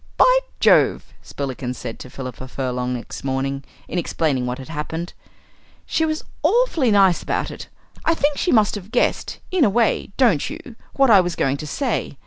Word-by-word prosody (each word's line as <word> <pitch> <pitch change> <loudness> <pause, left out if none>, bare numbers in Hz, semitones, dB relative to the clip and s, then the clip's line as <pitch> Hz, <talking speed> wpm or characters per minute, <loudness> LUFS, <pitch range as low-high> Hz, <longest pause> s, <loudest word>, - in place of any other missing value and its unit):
"By - - +6 0.2
Jove!" - - +3
Spillikins 130 -2 -5
said 115 - -7
to 130 - -9
Philippa 130 -1 -7
Furlong 125 -1 -2
next 120 - -7
morning, 135 +1 -2 0.2
in 180 - -2
explaining 145 -7 0
what 125 0 -3
had 135 +2 -10
happened, 160 +2 -4 0.7
"she 320 - 0
was 310 0 -2 0.2
awfully 345 - +3
nice 195 -4 +4
about - - -2
it. - - -9 0.4
I 330 - +2
think 290 -2 0
she 355 - +1
must 215 -3 +4
have 205 -1 -7
guessed, 245 +1 0
in 370 -4 +3
a 225 - +5
way, 230 +1 +1
don't 225 - +3
you, 305 -6 -9 0.2
what 270 -3 +4
I 200 -3 +8
was 175 -1 -3
going 135 +1 0
to 155 - -7
say? 240 - -2
175 Hz, 180 wpm, -21 LUFS, -, 0.7 s, I